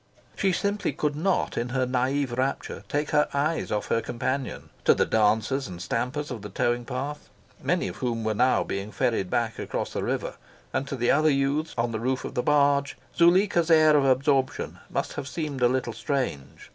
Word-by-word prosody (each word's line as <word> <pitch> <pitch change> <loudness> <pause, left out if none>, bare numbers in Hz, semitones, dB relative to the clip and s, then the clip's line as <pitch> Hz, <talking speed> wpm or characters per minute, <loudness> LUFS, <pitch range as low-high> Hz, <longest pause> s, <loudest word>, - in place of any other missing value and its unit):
She 195 - +2
simply 200 +3 -1
could 150 -1 -1
not, 180 -2 0
in 120 +1 -2
her 130 +1 0
naive 130 +2 0
rapture, 130 +3 -2
take 150 +1 -1
her 150 -1 +3
eyes 155 +3 0
off 105 - -2
her 115 - +2
companion. 130 +3 -3
To - - +6
the - - +2
dancers 110 +5 +1
and 90 -2 -8
stampers 125 +10 -2
of 120 -4 -5
the 105 - -7
towing 120 +4 0
path, 140 +4 -5 0.3
many - - 0
of 90 +2 -7
whom 115 -2 -2
were 110 0 0
now 125 +5 +3
being 100 +2 -4
ferried 115 -8 0
back 115 +1 -1
across - - -3
the - - -2
river, - - -2 0.4
and 140 - -1
to 140 - -3
the 120 -1 +2
other 155 +2 +4
youths 140 +3 0
on 115 0 0
the 110 - -3
roof 130 +3 -1
of - - -6
the 125 - 0
barge, 140 0 +2 0.2
Zuleika's 175 0 +4
air 155 -2 +6
of 140 -2 +4
absorption 135 0 +1
must - - -2
have 135 - -5
seemed 145 -3 -4
a 120 - +6
little 125 -2 -1
strange. 120 - -3
130 Hz, 195 wpm, -26 LUFS, 120-150 Hz, 0.4 s, To